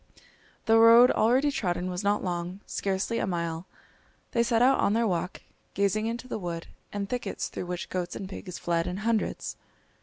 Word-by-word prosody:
The 225 0 +5
road 230 +2 +8
already 260 +6 +3
trodden 180 -8 -1
was 180 +2 -3
not 205 +1 +1
long, 180 +1 -3
scarcely 195 +4 -1
a - - -1
mile. 170 -1 -3 0.6
They 235 - +2
set 235 0 +3
out 265 +1 +4
on 200 - +2
their 230 +1 +2
walk, 180 -2 -2 0.3
gazing 200 +2 +1
into 235 +2 -4
the 240 - -4
wood 170 -3 -4 0.3
and 200 -1 -3
thickets 245 +3 -3
through 180 - -6
which 180 0 -4
goats 180 -1 -3
and 195 - -5
pigs 185 -2 -7
fled 170 0 0
in 180 +1 -3
hundreds. 230 -2 -1
200 Hz, 180 wpm, -28 LUFS, 180-230 Hz, 0.6 s, road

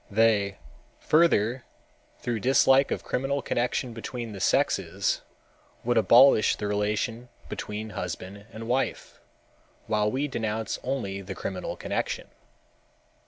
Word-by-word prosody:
They, 105 -2 +2 0.4
further, 130 -7 +3 0.6
through 120 -2 -2
dislike 135 +3 +4
of - - -3
criminal 135 +1 -1
connection 120 0 -1
between 115 0 -6
the 100 - -7
sexes, - - +1 0.6
would 120 +1 +1
abolish 115 +2 +6
the - - -5
relation 105 +4 -1 0.2
between 105 +1 -5
husband 100 +2 -6
and 115 0 -8
wife, 130 +3 -2 0.7
while 105 -1 +1
we 135 +6 -1
denounce 110 -4 -2
only 115 -7 -3
the 95 0 -7
criminal 95 -2 -4
connection. - - -3
115 Hz, 115 wpm, -27 LUFS, 105-125 Hz, 0.7 s, abolish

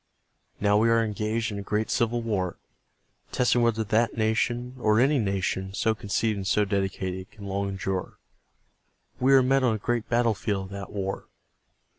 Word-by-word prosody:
Now 105 0 +3
we 115 +1 +3
are 115 0 +4
engaged 110 +2 -2
in 100 - -4
a - - -4
great 105 +2 -1
civil 120 0 +1
war.. 95 -6 -2 0.7
.testing 125 -1 +2
whether 115 -1 +2
that 110 +3 +1
nation, 120 +3 0
or 110 -1 +3
any 135 +3 +3
nation 95 -2 -2
so 110 +1 +2
conceived 105 +1 -1
and 95 -1 -4
so 105 +1 +3
dedicated... 95 -1 -2
can 100 - -12
long 100 0 -2
endure. 95 -1 -3 1.0
We 135 +2 +5
are 130 - +6
met 135 +1 +3
on 120 -3 +3
a - - -2
great 120 +2 -2
battlefield 110 -4 0
of 95 - -12
that 100 -1 -7
war. 95 -1 -4
105 Hz, 170 wpm, -26 LUFS, 100-115 Hz, 1.0 s, are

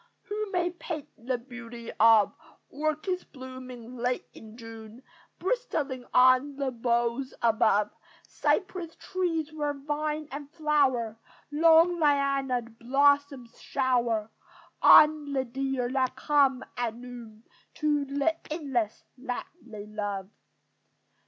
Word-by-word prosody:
Who 420 0 -4
may 355 -1 0
paint 330 -4 -6
the 250 +2 -3
beauty 235 -1 -9
of 220 -2 +6 0.4
Orchids 310 +5 -2
blooming 255 -2 -10
late 245 +1 -1
in 220 +1 -13
June, 225 +1 -11 0.3
Bristling 300 - -2
on 255 +3 +5
the 275 -1 -2
boughs 240 +2 -1
above! 220 -2 +3 0.4
Cypress 365 -4 -1
trees 330 -5 -2
where 295 -2 -2
vine 300 +2 -3
and 285 +1 -7
flower, 275 -8 +1 0.3
Long, 330 +3 +5
liana'd 275 -6 +1
blossoms 275 0 +1
shower 235 -5 0 0.5
On 300 -2 +7
the 265 -1 0
deer 265 0 -2
that 260 -1 0
come 275 -1 +2
at 235 -2 -1
noon 235 -3 -11 0.3
To 295 -2 +1
the 285 +4 0
inlets 270 -9 -2 0.2
that 250 -1 -4
they 215 -4 -9
love. 205 -2 -4
265 Hz, 110 wpm, -28 LUFS, 235-300 Hz, 0.5 s, On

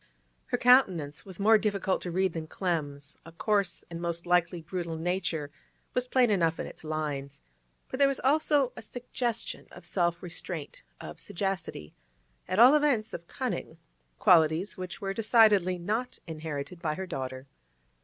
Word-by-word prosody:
Her 245 - 0
countenance 180 - +3
was 190 -1 -8
more 215 +2 +6
difficult 200 -3 0
to 180 - -4
read 185 0 +1
than 160 -1 -5
Clem's; 150 -5 -3
a 165 - -12
coarse, 195 0 0
and 170 0 -7
most 170 0 -2
likely 175 0 +2
brutal, 170 -1 -4
nature 165 -3 -2 0.4
was 250 0 0
plain 250 -3 +3
enough 165 -4 +2
in - - -2
its - - -11
lines, 145 -3 -4 0.4
but 260 - -6
there 280 - +6
was 275 -1 -1
also 285 -1 +2
a - - -8
suggestion 240 +1 -4
of - - -13
self 175 -2 0
restraint, 175 -3 -5 0.2
of 75 - -9
sagacity, 185 - -4 0.5
at 185 - -2
all 245 +5 +9
events 285 -8 +2
of 170 0 -7
cunning—qualities 170 -4 0
which 185 +2 -7
were 195 -1 -2
decidedly 210 -4 +4
not 220 +8 -2
inherited 160 0 -6
by 155 -3 -1
her 190 - -4
daughter. 130 -5 -5
180 Hz, 155 wpm, -29 LUFS, 160-215 Hz, 0.5 s, all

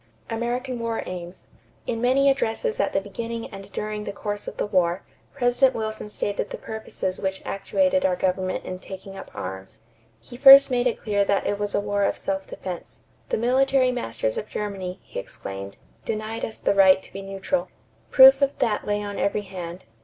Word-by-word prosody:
=American 240 +2 -2
War 230 -1 -2
Aims.= 180 0 -8 0.4
In 230 -1 -2
many 260 +3 +3
addresses 275 - 0
at - - +1
the - - +1
beginning 230 +4 -5
and 195 0 -10
during 210 0 -4
the 200 - -4
course 205 0 -5
of - - -6
the - - 0
war, 180 -2 +1 0.3
President 245 +2 +3
Wilson 220 -1 -4
stated 205 -1 -2
the - - -6
purposes 220 -4 -4
which 190 0 -3
actuated 280 +7 +1
our 185 -1 +2
government 185 0 -1
in 185 0 -5
taking 190 +1 -9
up - - -9
arms. 95 +3 -7 0.4
He 245 - -12
first 275 +1 +10
made 245 0 +2
it 240 - -1
clear 205 -2 +2
that 200 0 +1
it 205 - -1
was 205 -1 -2
a - - +3
war 205 0 0
of - - +1
self 195 0 -3
defense. 180 -2 -7 0.3
"The - - +1
military 255 +2 +3
masters 115 - -2
of 210 - -8
Germany," 195 -3 -4
he - - -6
exclaimed, 100 0 -8 0.3
"denied 220 +1 -4
us 220 - -8
the - - +1
right 190 -1 +6
to - - -16
be 195 - -6
neutral." 195 -2 -2 0.4
Proof 270 +1 +8
of 280 0 +1
that 220 -4 0
lay 205 0 0
on 205 -1 -5
every 205 +1 0
hand. 180 -2 -7
205 Hz, 190 wpm, -24 LUFS, 190-240 Hz, 0.4 s, first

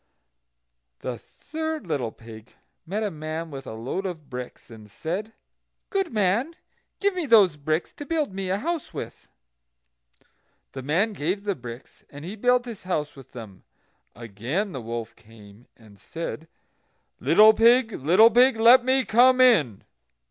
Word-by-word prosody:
The 125 -3 -5
third 315 - -6
little 140 -9 -2
pig 110 0 -14 0.3
met 205 +5 -2
a 210 - -2
man 155 +1 -6
with 135 -1 -8
a 110 - -7
load 135 - -4
of 160 -6 -9
bricks, 125 -1 -8
and 110 -2 -13
said: 180 - -5 0.6
"Good 390 -3 -1
man, 220 - 0 0.4
give 405 0 +1
me 355 -4 -3
those 205 - +5
bricks 155 +3 -2
to 290 - -10
build 310 - -1
me 190 -1 -4
a 190 - 0
house 330 +6 -4
with." - - -8 1.4
The 135 - -7
man 175 - 0
gave 185 +4 -2
the 205 -1 -1
bricks, 120 -5 -11
and 145 +2 -10
he 190 +5 -6
built 245 +3 +2
his 230 -4 -8
house 155 -5 -3
with 135 -2 -15
them. 110 -6 -10 0.5
Again 120 - -4
the 130 - -6
wolf 115 0 -6
came, 105 0 -18
and 105 -3 -19
said: 165 -1 -7 0.7
"Little 215 +1 +6
pig, 230 +1 +4
little 190 - +4
pig, 250 +2 +4
let 240 +3 +7
me 260 0 +2
come 255 +5 +4
in." 165 - +4
180 Hz, 155 wpm, -24 LUFS, -, 1.4 s, let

